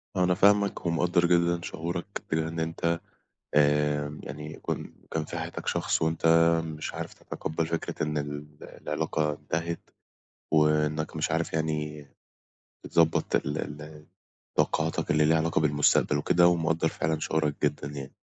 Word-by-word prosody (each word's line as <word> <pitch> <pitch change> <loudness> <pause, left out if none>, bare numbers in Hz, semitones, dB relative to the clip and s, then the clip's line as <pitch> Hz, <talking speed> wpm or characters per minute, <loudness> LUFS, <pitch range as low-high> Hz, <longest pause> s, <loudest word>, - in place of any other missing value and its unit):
أنا 90 0 +3
فاهمك، 100 0 +3
ومقدر 85 +1 +2
جدًا 85 0 +3
شعورك، 85 +4 -4
بإن 80 +1 -1
أنت 85 +1 -1 0.6
آآ 75 0 +2
يعني، 75 +3 -7
كون - - -4 0.2
كان 80 -1 -1
في - - -5
حياتك - - -6
شخص، - - 0
وأنت 80 +1 0 0.4
مش 80 -1 -5
عارف - - -5
تتقبل 80 +1 -4
فكرة 85 -1 -3
إن 75 0 -1
ال 75 0 -4 0.2
العِلاقة 75 -1 -2
انتهت، 85 +3 -4 0.6
وإنك 75 0 +2
مش 80 0 -1
عارف، 80 0 -1
يعني 75 -2 -2 0.8
تضبط 80 -1 +2
ال 75 +2 -1
ال 75 +1 -5
ال 75 0 -11 0.5
طاقاتك 80 +1 +1
اللي 75 0 +4
ليها 80 +1 +4
علاقة 80 -1 +1
بالمستقبل 75 -1 +3
وكده، 85 +4 +4
ومقدر 80 -1 +1
فعلًا 80 0 -1
شعورك 80 -2 0
جدًا 70 - 0
يعني. 70 -2 -7
80 Hz, 140 wpm, -28 LUFS, 75-85 Hz, 0.8 s, اللي